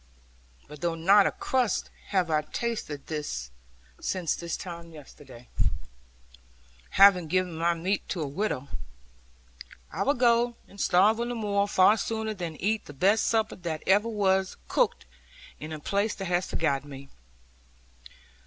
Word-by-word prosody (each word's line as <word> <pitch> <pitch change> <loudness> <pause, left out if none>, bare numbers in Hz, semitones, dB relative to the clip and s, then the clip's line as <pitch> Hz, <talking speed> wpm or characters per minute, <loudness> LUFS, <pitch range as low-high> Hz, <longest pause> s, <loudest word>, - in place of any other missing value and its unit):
But 150 0 -12
though 170 -1 0
not 195 +5 +5
a - - 0
crust 250 -6 -1 0.2
have 185 -4 0
I 155 -1 +3
tasted 155 -4 -4 0.9
since 180 -4 -1
this 170 -1 -4
time 170 -2 -8
yesterday, 135 -4 -14 1.5
having 190 -4 +7
given 185 +1 0
my 170 +1 +1
meat 185 +5 -2
to 175 - -2
a - - -3
widow, 140 -3 -2 1.2
I - - -4
will 285 +2 +2
go 240 -1 +3
and 200 - -9
starve 200 +5 +4
on 235 0 -2
the 245 - -3
moor 205 -2 0
far 200 +2 +5
sooner 220 +1 -2
than 175 -5 -5
eat 215 +6 -1
the 145 - -10
best 195 +10 +2
supper 220 -1 0
that 165 -3 -5
ever 205 +4 +3
was 190 -3 +1
cooked, 485 -1 +1 0.5
in 155 - -7
a 155 - -5
place 200 +7 -1
that 195 - -5
has 180 0 0
forgotten 145 -3 -1
me.' 135 0 -10
185 Hz, 145 wpm, -27 LUFS, 160-215 Hz, 1.5 s, having